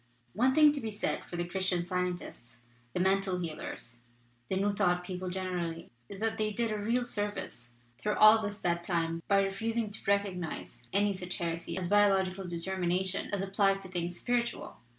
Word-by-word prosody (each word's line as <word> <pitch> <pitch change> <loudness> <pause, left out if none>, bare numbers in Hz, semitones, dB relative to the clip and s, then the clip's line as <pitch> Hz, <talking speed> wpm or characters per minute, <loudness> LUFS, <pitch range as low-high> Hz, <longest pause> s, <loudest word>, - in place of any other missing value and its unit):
"One 250 +6 +3
thing 300 +1 +7
to 285 - -3
be 225 - -3
said 210 0 -2
for - - -7
the 175 0 -1
Christian 185 0 0
Scien 180 0 -1
tists, 120 -7 -11 0.3
the - - -2
Mental 190 0 +2
Healers, 155 -8 -6 0.5
the - - 0
New 200 +2 +1
Thought 180 -3 +2
peo 180 0 -5
ple 185 0 -3
generally, 180 -3 -3 0.2
is 195 - -8
that 220 0 -1
they 215 0 +1
did 230 0 0
a 215 - -1
real 235 +4 +1
service 205 - -3 0.3
through 210 0 0
all 215 +1 +8
this 205 -1 -3
bad 170 -3 0
time 165 -2 -1
by 200 -1 +4
refusing 220 +3 -1
to 210 - -7
recognize 200 -4 -1
any 200 +1 +3
such 180 -1 -4
heresy 170 -1 -3
as 185 -2 -2
biological 195 -1 +3
determination 185 +2 -1
as 200 -1 -1
applied 195 0 +2
to 190 - -9
things 175 -1 -3
spiritual. 240 +2 -1
190 Hz, 185 wpm, -31 LUFS, 175-205 Hz, 0.5 s, all